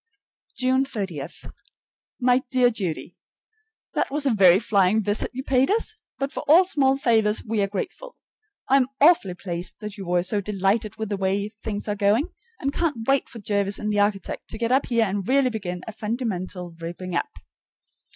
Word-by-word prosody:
June 260 +1 +2
30. 195 - -4 1.0
My 250 0 +3
dear 250 -2 +4
Judy: 185 -8 -4 0.7
That - - 0
was 290 +1 +1
a 270 - +3
very 190 -5 +6
flying 200 +1 +2
visit 205 +1 0
you 260 +1 -5
paid 260 0 +2
us; 435 +1 +1 0.2
but 275 +1 -2
for - - -5
all 335 +6 +7
small 270 -6 +2
favors 220 -5 +2
we 220 -1 0
are 200 - +2
grateful. 365 - -6 0.5
I 270 - +5
am 255 -2 +3
awfully 285 - +5
pleased 175 -1 -3
that 210 -1 -7
you 195 -3 -7
were 175 0 +2
so 205 +3 0
delighted 205 +2 0
with 220 -2 -4
the 205 - -1
way 195 +2 0
things 210 -1 -6
are 210 - 0
going, 210 +8 +2 0.3
and 275 0 -2
I - - -8
can't 290 -10 -1
wait 275 0 +2
for - - -10
Jervis 200 -1 -1
and 210 0 -2
the 205 - +1
architect 205 -1 -1
to - - -6
get 230 +1 -1
up 265 +2 +3
here 235 -2 +2
and 195 -1 -3
really 265 -1 +3
begin 180 -5 -5
a - - -6
fundamental 200 -6 -4
ripping 175 +2 -6
up. - - 0
215 Hz, 190 wpm, -24 LUFS, 195-260 Hz, 1.0 s, all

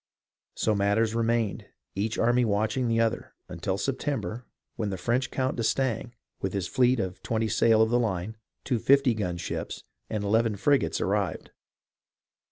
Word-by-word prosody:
So 110 - +1
matters 105 +2 +2
remained, 115 -2 0 0.3
each 105 +3 -2
army 120 +2 +3
watching 110 +4 0
the 115 0 +1
other, 115 -1 -1
until 90 +2 -3
September, 125 0 -3 0.3
when 110 -3 -2
the 95 - -3
French 120 +8 0
Count 130 -1 -1
d'Estaing, 120 0 -1 0.2
with 95 - -3
his 95 -3 -1
fleet 125 +2 +3
of 95 -2 -3
twenty 110 -1 -1
sail 110 +1 +4
of 110 - 0
the 120 - +3
line, 105 -2 -2 0.3
two 125 -4 0
fifty 135 +1 +4
gun 90 -5 -2
ships, 85 - -5 0.3
and 105 -2 -2
eleven 110 +1 +2
frigates, 140 +7 +2
arrived. - - -1
115 Hz, 155 wpm, -27 LUFS, 100-120 Hz, 0.3 s, sail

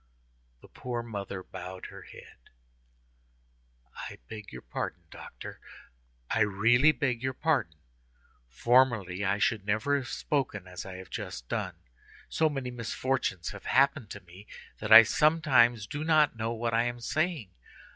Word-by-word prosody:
The - - -15
poor 120 -2 -5
mother 100 -4 -6
bowed 95 0 -8
her - - -11
head. - - -14 1.6
"I - - -7
beg 110 -2 -9
your 60 - -9
pardon, - - -5
doctor, - - -10 0.7
I 115 - 0
really 110 +8 +4
beg 125 -4 -1
your 130 0 -2
pardon. 135 - 0 0.7
Formerly 105 - +2
I 100 +1 +1
should 105 0 +1
never 110 +8 +1
have 130 -3 -5
spoken 130 -12 -2
as 90 0 -8
I 95 - -8
have 95 -2 -10
just - - -6
done; - - -3 0.5
so 160 -1 +2
many 135 -4 -4
misfortunes 120 -5 -2
have 100 - -10
happened 135 -3 +2
to - - -8
me, 90 +4 -15 0.3
that 110 0 -5
I 115 +1 +12
sometimes 130 -6 +3
do 150 +8 -5
not 155 -4 +3
know 115 +1 -2
what 115 0 -2
I 115 +1 +3
am 120 0 -3
saying. 155 - -2
115 Hz, 145 wpm, -29 LUFS, 100-130 Hz, 1.6 s, I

